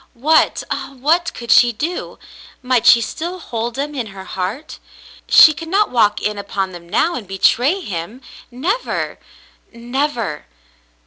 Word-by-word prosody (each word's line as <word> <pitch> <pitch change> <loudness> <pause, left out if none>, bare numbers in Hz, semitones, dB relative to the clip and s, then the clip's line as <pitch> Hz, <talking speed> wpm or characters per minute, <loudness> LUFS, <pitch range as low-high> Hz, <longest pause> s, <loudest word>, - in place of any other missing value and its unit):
What 310 +6 +2
— - - -17
ah, 275 - -4
what 330 +6 +1
could 235 -1 -4
she 240 -1 +6
do! 320 +10 -5 0.5
Might 250 -2 +1
she 235 - +7
still 340 +10 -5
hold 235 -7 -5
him 290 +2 -3
in 250 -6 -4
her 195 -1 -10
heart? 195 +12 -5 0.5
She 310 - +8
could 325 +2 -8
not 400 +5 +1
walk 215 -4 +2
in 210 -1 -2
upon 195 -1 -3
them 170 -1 -12
now 320 - +1
and 230 -6 -6
betray 245 - +2
him 200 - -6 0.2
— - - -19
never 345 - -3 0.3
— - - -33
never. 235 - -3
245 Hz, 165 wpm, -18 LUFS, 210-310 Hz, 0.5 s, She